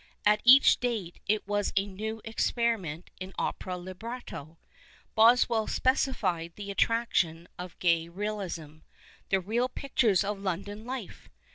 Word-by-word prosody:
At 210 Hz, 0 st, +4 dB
each 260 Hz, +3 st, +7 dB
date 220 Hz, -8 st, -3 dB
it 210 Hz, -1 st, 0 dB
was 205 Hz, 0 st, 0 dB
a 195 Hz, -, +3 dB
new 215 Hz, +3 st, -5 dB
experiment 225 Hz, -7 st, -1 dB
in 185 Hz, +1 st, -7 dB
opera 185 Hz, -1 st, -3 dB
libretto. 185 Hz, -, -8 dB, 0.6 s
Boswcll 230 Hz, 0 st, +4 dB
specified 200 Hz, -, 0 dB
the 200 Hz, -1 st, -6 dB
attraction 195 Hz, -7 st, +1 dB
of 180 Hz, -1 st, -8 dB
Gay's 170 Hz, -2 st, +2 dB
realism 180 Hz, -5 st, -5 dB, 0.2 s
— -, -, -26 dB
" -, -, -30 dB
the 195 Hz, -, +3 dB
real 230 Hz, +7 st, 0 dB
pictures 240 Hz, -10 st, +1 dB
of 205 Hz, 0 st, -3 dB
London 200 Hz, +3 st, -4 dB
life." 250 Hz, -5 st, -7 dB
205 Hz, 135 wpm, -29 LUFS, 180-230 Hz, 0.6 s, each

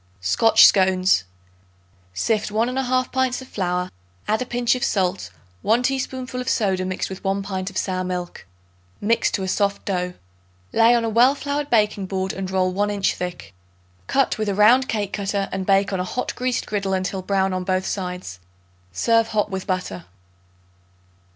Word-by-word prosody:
Scotch 90 Hz, -, +5 dB
Scones. 185 Hz, -, +4 dB, 0.9 s
Sift 210 Hz, -, 0 dB
1 220 Hz, +3 st, 0 dB
1/2 255 Hz, -1 st, 0 dB
pints 260 Hz, -1 st, 0 dB
of 260 Hz, -, -10 dB
flour; 180 Hz, -3 st, -2 dB, 0.4 s
add 220 Hz, +2 st, +1 dB
a 255 Hz, -, -3 dB
pinch 240 Hz, -1 st, +1 dB
of 255 Hz, -, -3 dB
salt, 190 Hz, -1 st, 0 dB, 0.3 s
1 230 Hz, +3 st, +2 dB
teaspoonful 260 Hz, -1 st, -2 dB
of 250 Hz, -, -3 dB
soda 190 Hz, -4 st, +1 dB
mixed 185 Hz, 0 st, -2 dB
with 190 Hz, 0 st, -8 dB
1 195 Hz, 0 st, -1 dB
pint 190 Hz, -1 st, -4 dB
of 195 Hz, -, -8 dB
sour 185 Hz, -1 st, -1 dB
milk. 180 Hz, -, -5 dB, 0.5 s
Mix 230 Hz, +3 st, +2 dB
to 195 Hz, -, -2 dB
a -, -, -3 dB
soft 200 Hz, +1 st, 0 dB
dough. 180 Hz, -2 st, -2 dB, 0.6 s
Lay 230 Hz, +1 st, +5 dB
on 235 Hz, -1 st, +1 dB
a -, -, 0 dB
well 245 Hz, +5 st, +4 dB
floured 285 Hz, 0 st, -3 dB
baking 210 Hz, -4 st, +2 dB
board 190 Hz, 0 st, -2 dB
and 195 Hz, -1 st, -4 dB
roll 185 Hz, -1 st, +1 dB
1 205 Hz, +3 st, 0 dB
inch 200 Hz, -1 st, 0 dB
thick. 140 Hz, -, -6 dB, 0.5 s
Cut 270 Hz, -4 st, +1 dB
with 215 Hz, -1 st, 0 dB
a 200 Hz, -, -1 dB
round 240 Hz, +6 st, +5 dB
cake 205 Hz, -3 st, -2 dB
cutter 200 Hz, -1 st, -1 dB
and 190 Hz, -1 st, -4 dB
bake 195 Hz, 0 st, +3 dB
on 190 Hz, -, -1 dB
a -, -, 0 dB
hot 250 Hz, +7 st, -3 dB
greased 250 Hz, -1 st, -2 dB
griddle 200 Hz, -2 st, -2 dB
until 190 Hz, 0 st, -2 dB
brown 195 Hz, 0 st, 0 dB
on 185 Hz, 0 st, -2 dB
both 185 Hz, 0 st, 0 dB
sides. 180 Hz, -, -4 dB, 0.5 s
Serve 230 Hz, -, +2 dB
hot 210 Hz, -2 st, -1 dB
with 190 Hz, 0 st, -4 dB
butter. 180 Hz, -, -3 dB
200 Hz, 175 wpm, -22 LUFS, 185-230 Hz, 0.9 s, Scotch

